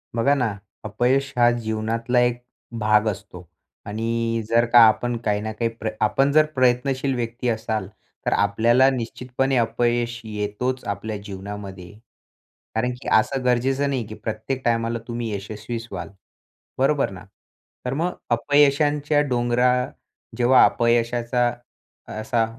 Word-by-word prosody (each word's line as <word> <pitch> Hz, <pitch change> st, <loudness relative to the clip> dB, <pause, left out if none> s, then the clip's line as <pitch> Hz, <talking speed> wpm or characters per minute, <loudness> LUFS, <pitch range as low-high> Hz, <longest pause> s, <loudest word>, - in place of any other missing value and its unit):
बघा 120 Hz, +5 st, +3 dB
ना, 115 Hz, -7 st, -1 dB, 0.3 s
अपयश 125 Hz, +6 st, 0 dB
हा 120 Hz, 0 st, +6 dB
जीवनातला 115 Hz, +1 st, -1 dB
एक 120 Hz, 0 st, +1 dB, 0.4 s
भाग 105 Hz, 0 st, +3 dB
असतो 100 Hz, -4 st, -6 dB, 0.4 s
आणि 115 Hz, +2 st, -1 dB
जर 115 Hz, +1 st, +4 dB
का 120 Hz, -, +9 dB
आपण 120 Hz, +2 st, 0 dB
काही 105 Hz, -1 st, +1 dB
ना 110 Hz, +1 st, -4 dB
काही 115 Hz, +2 st, -1 dB
प्र 110 Hz, -, -2 dB
आपण 135 Hz, +6 st, +2 dB
जर 155 Hz, +1 st, +5 dB
प्रयत्नशील 130 Hz, +2 st, +1 dB
व्यक्ती 120 Hz, 0 st, -3 dB
असाल 110 Hz, -3 st, -2 dB, 0.4 s
तर -, -, +2 dB
आपल्याला 115 Hz, +6 st, +3 dB
निश्चितपणे 130 Hz, +1 st, -2 dB
अपयश 120 Hz, +1 st, 0 dB
येतोच 110 Hz, +4 st, -3 dB
आपल्या 100 Hz, +2 st, -4 dB
जीवनामध्ये. 95 Hz, -2 st, -8 dB, 0.8 s
कारण 125 Hz, +3 st, 0 dB
की -, -, -9 dB
असं 130 Hz, +4 st, 0 dB
गरजेचं 130 Hz, +3 st, +1 dB
नाही, 130 Hz, -5 st, -2 dB
की 110 Hz, -, -8 dB
प्रत्येक 115 Hz, +5 st, -4 dB
टायमाला 115 Hz, 0 st, 0 dB
तुम्ही 120 Hz, -1 st, -3 dB
यशस्वी 105 Hz, +3 st, -5 dB
व्हाल, -, -, -6 dB, 0.7 s
बरोबर 135 Hz, -1 st, +2 dB
ना? 95 Hz, -1 st, -10 dB, 0.6 s
तर 125 Hz, -, -2 dB
मग 170 Hz, +5 st, -1 dB, 0.2 s
अपयशांच्या 145 Hz, +3 st, +3 dB
डोंगरा 120 Hz, 0 st, +2 dB, 0.7 s
जेव्हा 125 Hz, +1 st, +6 dB
अपयशाचा 120 Hz, +1 st, +1 dB, 0.7 s
असा 115 Hz, +1 st, +1 dB
120 Hz, 130 wpm, -23 LUFS, 110-125 Hz, 0.8 s, का